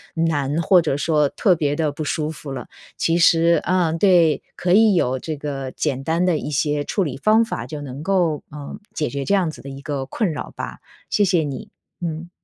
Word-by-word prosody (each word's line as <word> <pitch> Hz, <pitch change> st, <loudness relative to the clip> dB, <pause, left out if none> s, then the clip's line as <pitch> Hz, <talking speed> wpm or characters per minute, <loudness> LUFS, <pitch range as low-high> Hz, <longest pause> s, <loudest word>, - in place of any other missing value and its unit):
难， 160 Hz, -2 st, 0 dB
或 180 Hz, +2 st, +5 dB
者 145 Hz, -4 st, -1 dB
说 150 Hz, -2 st, +2 dB
特 185 Hz, -5 st, +2 dB
别 145 Hz, -2 st, 0 dB
地 155 Hz, -2 st, +1 dB
不 155 Hz, -, -4 dB
舒 150 Hz, +1 st, -1 dB
服 150 Hz, -2 st, -8 dB
了。 135 Hz, -, -6 dB, 0.3 s
其 165 Hz, +1 st, +1 dB
实 170 Hz, 0 st, +4 dB
嗯， 175 Hz, -3 st, +1 dB
对， 175 Hz, -5 st, +4 dB, 0.2 s
可 180 Hz, 0 st, +1 dB
以 215 Hz, 0 st, +6 dB
有 130 Hz, -5 st, +1 dB
这 155 Hz, +3 st, -5 dB
个 135 Hz, -3 st, -4 dB
简 135 Hz, -3 st, -2 dB
单 165 Hz, +4 st, +1 dB
的 175 Hz, -4 st, +2 dB
一 150 Hz, -, -5 dB
些 145 Hz, 0 st, 0 dB
处 195 Hz, +2 st, -1 dB
理 140 Hz, -, -4 dB
方 215 Hz, +9 st, +3 dB
法， 120 Hz, -, -4 dB
就 145 Hz, +4 st, -6 dB
能 140 Hz, 0 st, -7 dB
够， 175 Hz, -5 st, +1 dB
呃， 145 Hz, +4 st, -8 dB, 0.2 s
解 150 Hz, -, -1 dB
决 140 Hz, 0 st, -3 dB
这 200 Hz, -, 0 dB
样 185 Hz, -5 st, +2 dB
子 -, -, -9 dB
的 140 Hz, -, -9 dB
一 135 Hz, +1 st, -8 dB
个 140 Hz, -2 st, -3 dB
困 175 Hz, -, -1 dB
扰 -, -, -6 dB
吧。 -, -, -6 dB, 0.3 s
谢 205 Hz, -, +2 dB
谢 175 Hz, -4 st, +2 dB
你， 140 Hz, -4 st, -6 dB, 0.3 s
嗯。 170 Hz, 0 st, -4 dB
155 Hz, 230 characters per minute, -21 LUFS, 145-175 Hz, 0.3 s, 以